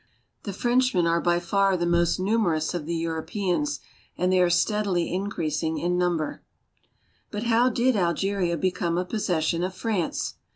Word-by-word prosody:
The 200 - -3
Frenchmen 240 -4 +2
are 170 0 +2
by 175 -1 +2
far 195 +2 +2
the 175 - -1
most 170 +1 +2
numer 195 -4 +1
ous 155 +3 -2
of 165 -4 -4
the 170 - -1
Europeans, 180 - -2 0.4
and 185 +1 +1
they 185 - +4
are 180 - +4
steadily 185 -1 +1
increasing 160 -5 -2
in 175 +1 0
number. 175 -3 -1 0.9
But 210 +1 -4
how 240 +1 +3
did 245 +1 +2
Algeria 180 -1 0
become 175 -1 -1
a 180 - 0
possession 175 -6 -1
of 185 +1 -2
France. 195 -4 -2
180 Hz, 160 wpm, -25 LUFS, 170-205 Hz, 0.9 s, they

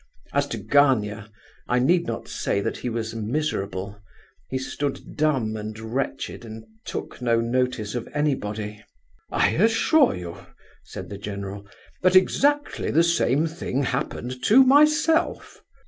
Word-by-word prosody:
As - - +1
to - - -4
Gania, 110 -7 +2 0.4
I 125 - +1
need 170 +7 +3
not - - -4
say - - -1
that 100 - -2
he 125 - -4
was 115 -1 -3
miserable; 105 -5 -3 0.5
he 130 - -1
stood 140 +1 -4
dumb 135 -8 +1
and 110 0 -6
wretched 120 +3 -4
and 110 -1 -9 0.2
took - - -6
no 115 -2 +2
notice 120 -2 -1
of 120 -2 -4
anybody. 105 -8 -2 0.5
"I - - +3
assure 225 - +3
you," 85 -1 -7 0.5
said - - -8
the 100 - -7
general, 100 -1 -6 0.3
"that 185 0 +3
exactly 290 +10 +2
the 165 +3 +4
same 165 -3 +2
thing 155 -4 -2
happened 125 -1 -3
to 255 +5 +7
myself!" 300 +5 +3
125 Hz, 135 wpm, -24 LUFS, 110-160 Hz, 0.5 s, to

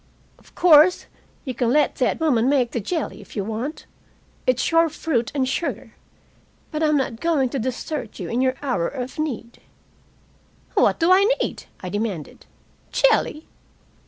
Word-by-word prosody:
"Of - - -23
course 340 +1 +6 0.4
you 260 - -3
can 235 0 0
let 290 +2 +2
that 255 - +1
woman 260 -7 +2
make 260 -4 +2
the 235 - -2
jelly, 310 - -3
if - - -15
you 205 - -1
want. 225 +9 -5 0.6
It's 255 +4 +2
your 330 0 +4
fruit 250 -6 -1
and 265 -2 +1
sugar. 300 +6 -3 0.8
But 305 -1 -3
I'm 305 -1 +3
not 255 -4 -2
going 305 -6 +1
to 270 - -3
desert 255 +1 -4
you 180 - -4
in 235 +6 -1
your 260 0 +1
hour 245 -12 0
of 255 +1 -6
need." 240 -6 -4 1.1
"What - - +3
do 335 +2 +3
I 385 +2 +6
need?" - - -3 0.2
I 185 - -5
demanded. 205 -6 -4 0.4
"Jelly?" 320 -10 +2
260 Hz, 160 wpm, -22 LUFS, 235-310 Hz, 1.1 s, course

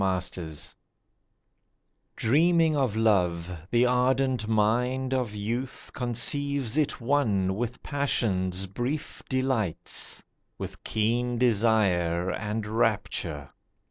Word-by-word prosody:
LOVE 90 -4 -2 1.4
DREAMING 160 +5 +3
of 130 -7 +1
love, 90 -6 +1
the 120 +3 +3
ardent 125 -1 +1
mind 125 +5 +1
of 125 -5 -1
youth 120 +6 -4
Conceives 130 +1 +1
it 155 -2 +1
one 115 -8 +1
with 120 +4 -4
passion's 95 -10 0
brief 120 +10 -4
delights, 130 - 0 0.3
With - - -7
keen 120 +3 0
desire 100 -7 +2
and 105 +2 -3
rapture. 105 - -1
115 Hz, 90 wpm, -27 LUFS, 95-130 Hz, 1.4 s, DREAMING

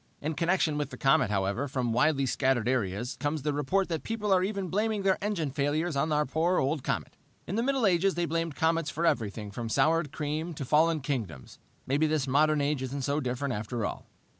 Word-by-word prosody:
"In 155 +2 -2
connection 165 -2 +1
with 145 - -2
the - - -9
comet, 135 -6 +3
however, 100 +7 0
from 125 -4 -1
widely 140 +2 +2
scattered 130 -2 +1
areas 120 -1 -1
comes 145 -1 -2
the 150 0 0
report 165 +7 +1
that 165 -2 -2
people 210 -3 -1
are 185 -1 +3
even 195 -1 -2
blaming 210 +2 0
these 195 -1 +4
engine 185 -8 -1
failures 150 +3 0
on 155 +3 0
our 150 0 +2
poor, 165 +7 +1
old 140 +1 0
comet. - - -3 0.3
In - - -5
the 230 - +1
Middle 265 -1 +1
Ages 190 0 +3
they 175 0 0
blamed 165 -2 -2
comets 165 -1 +1
for 165 +2 -2
everything 110 -9 -1
from 115 +2 -5
soured 160 +4 +2
cream 155 +3 -3
to 140 - -5
fallen 155 +3 +3
kingdoms. 110 - -4 0.3
Maybe 145 +4 +2
this 155 -3 0
modern 150 +2 +3
age 140 -1 0
isn't 135 +1 -4
so 145 +2 0
different, 130 0 -2
after 110 +1 -3
all. - - -5
150 Hz, 210 wpm, -29 LUFS, 130-165 Hz, 0.3 s, these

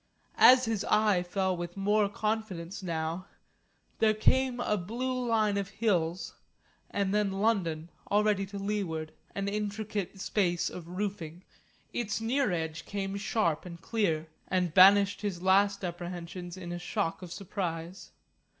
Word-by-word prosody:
As 255 0 +8
his 225 -3 -1
eye 210 -4 +3
fell 185 +1 -1
with 175 +1 -6
more 205 +1 +2
confidence 205 -4 -3
now, 165 +1 -3 0.7
there 215 -1 +4
came 255 +3 +2
a 210 - +1
blue 245 +6 -2
line 215 -3 +2
of 195 -1 -4
hills, 175 -6 0 0.6
and 200 -1 -1
then 210 -1 +2
London, 185 -6 0 0.2
already 205 -1 +2
to 200 +1 -7
leeward, 195 -6 -3 0.2
an 200 0 -2
intricate 210 -1 -3
space 180 -3 0
of 170 -2 -8
roofing. 180 -3 -4 0.5
Its 220 -3 -1
near 245 +1 +1
edge 160 -2 -3
came 195 -1 -3
sharp 200 -5 0
and 170 -2 -9
clear, 165 -6 0 0.2
and 180 -3 0
banished 200 +2 +7
his 190 -4 -3
last 200 +1 +3
apprehensions 175 0 -6
in 175 -2 -7
a 175 - -4
shock 180 -1 -2
of 180 -2 -8
surprise. 175 -2 -5
195 Hz, 140 wpm, -30 LUFS, 175-210 Hz, 0.7 s, As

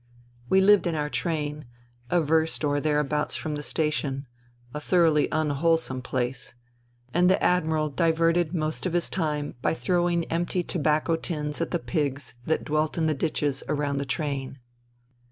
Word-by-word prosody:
We 190 - +5
lived 200 -1 +5
in 165 - -1
our 150 -1 -2
train, 150 0 -2 0.4
a 175 -1 +3
verst 160 +1 +1
or 145 -1 +1
thereabouts 150 0 0
from 155 - -3
the 145 - -3
station 150 -2 -1 0.2
— 120 0 -29
a 150 - -3
thoroughly 160 -2 +3
unwholesome 155 -2 +1
place; 125 -1 -3 0.6
and 180 +2 +4
the 190 - +4
Admiral 160 -3 +2
diverted 165 +1 +2
most 155 0 -1
of 175 - -4
his 175 -1 0
time 150 -5 -2
by 160 - +1
throwing 175 -1 +1
empty 175 +2 -1
tobacco 155 0 +1
tins 150 -2 -4
at 165 - -1
the 175 - 0
pigs 145 -6 -2
that 160 - +1
dwelt 155 +1 0
in 165 - +1
the 155 - +2
ditches 145 -2 -1
around 145 -2 0
the - - -1
train. 140 -2 -3
155 Hz, 160 wpm, -26 LUFS, 145-165 Hz, 0.6 s, We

